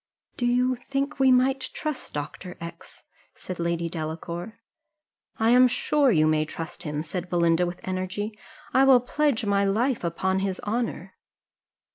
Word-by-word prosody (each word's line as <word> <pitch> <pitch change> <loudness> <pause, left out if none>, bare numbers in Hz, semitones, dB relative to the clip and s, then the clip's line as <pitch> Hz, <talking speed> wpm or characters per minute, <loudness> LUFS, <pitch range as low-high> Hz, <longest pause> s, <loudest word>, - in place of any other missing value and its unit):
"Do 245 - 0
you 250 +1 +2
think 275 +4 -3
we 265 -1 +5
might 260 +1 +2
trust 305 -3 -4
Dr. 150 +5 -6
X 170 0 -10 0.2
?" - - -33
said 185 -2 -7
Lady 170 0 -1
Delacour. 170 +5 -5 0.8
"I 225 +1 +3
am 250 +1 +7
sure 285 +3 +2
you 155 -6 +4
may 155 0 +3
trust 165 +2 -7
him," 150 -1 -3
said 180 +3 -5
Belinda, 170 0 +2
with 175 0 -6
energy; 185 +3 -3 0.4
"I 265 - +5
will 265 -2 +7
pledge 250 -1 0
my 200 0 +2
life 225 +5 +1
upon 190 +3 0
his 190 -1 -2
honour." 230 +3 -3
195 Hz, 155 wpm, -26 LUFS, 170-250 Hz, 0.8 s, am